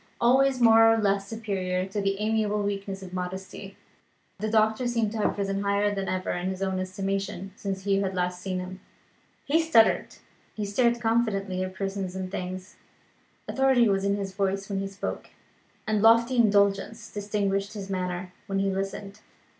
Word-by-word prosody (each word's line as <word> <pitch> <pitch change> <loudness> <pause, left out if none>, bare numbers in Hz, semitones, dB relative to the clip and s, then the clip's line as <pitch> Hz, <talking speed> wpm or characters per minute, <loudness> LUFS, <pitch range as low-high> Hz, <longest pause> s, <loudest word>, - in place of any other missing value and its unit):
Always 260 +2 +4
more 225 -1 +7
or 225 - +3
less 200 -2 +1
superior 190 -5 -2
to 195 +2 -3
the 195 0 0
amiable 210 -1 0
weakness 195 -1 -3
of 185 -1 -10
modesty, 190 +2 -6 0.6
the 215 +2 -2
doctor 220 +2 +2
seemed 230 -3 0
to 225 - -4
have 210 - 0
risen 195 0 -1
higher 200 +1 +1
than 195 -1 -3
ever 185 0 -2
in 180 +1 -2
his 190 0 -3
own 190 -1 -1
estimation, 195 0 -3
since 195 -2 -4
Hugh 195 0 +2
had 190 -1 -2
last 180 0 -1
seen 185 -1 -3
him. 185 +1 -6 0.7
He 315 +4 +3
strutted; 315 -9 +3 0.4
he 210 - -3
stared 235 +4 +2
confidently 210 -5 0
at 185 0 -6
persons 195 -1 -3
and 185 -1 -4
things; 185 +1 -6 0.7
authority 265 -3 +3
was 195 -1 +1
in 200 0 +2
his 195 -2 -4
voice 195 0 -1
when 195 - -1
he 195 - -2
spoke, 195 0 -5 0.6
and 215 -1 +1
lofty 230 +3 +5
indulgence 205 0 +2
distinguished 200 -1 -1
his 200 -2 -6
manner 180 -1 -3
when 195 - -1
he 195 0 +1
listened. 195 +1 -4
200 Hz, 170 wpm, -27 LUFS, 190-215 Hz, 0.7 s, more